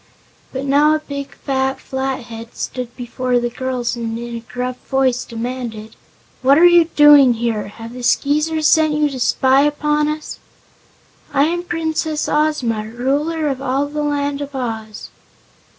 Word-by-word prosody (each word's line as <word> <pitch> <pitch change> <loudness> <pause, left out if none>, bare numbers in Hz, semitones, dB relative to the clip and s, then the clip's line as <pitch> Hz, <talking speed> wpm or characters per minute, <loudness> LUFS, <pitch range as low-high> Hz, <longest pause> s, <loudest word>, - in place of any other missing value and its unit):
But 265 +1 -4
now 295 +3 +4
a - - -1
big 280 -2 -7
fat 265 0 -1
Flathead 245 -4 -5
stood 250 -2 -5
before 250 0 -1
the 240 0 -1
girls 250 -1 -2
and 230 -1 -4
in 235 0 -6
a - - -4
gruff 250 +2 -5
voice 265 -2 +1
demanded: 230 -2 -6 0.5
"What 270 +2 +5
are 340 - +7
you 345 -1 +7
doing 295 -5 +6
here? 225 -3 -2
Have 225 +3 -10
the 250 - -8
Skeezers 300 +5 +1
sent 310 0 +4
you 300 -1 +1
to 260 - -6
spy 265 +2 +3
upon 295 +1 +1
us?" 305 0 -5 0.9
"I 275 - +3
am 340 +3 0
Princess 320 -3 -2
Ozma, 260 -8 0
Ruler 285 +7 -1
of 270 -2 -2
all 275 +1 0
the 300 +1 -4
Land 285 -1 -1
of 285 -1 -6
Oz." 225 -4 -5
265 Hz, 155 wpm, -19 LUFS, 240-300 Hz, 0.9 s, are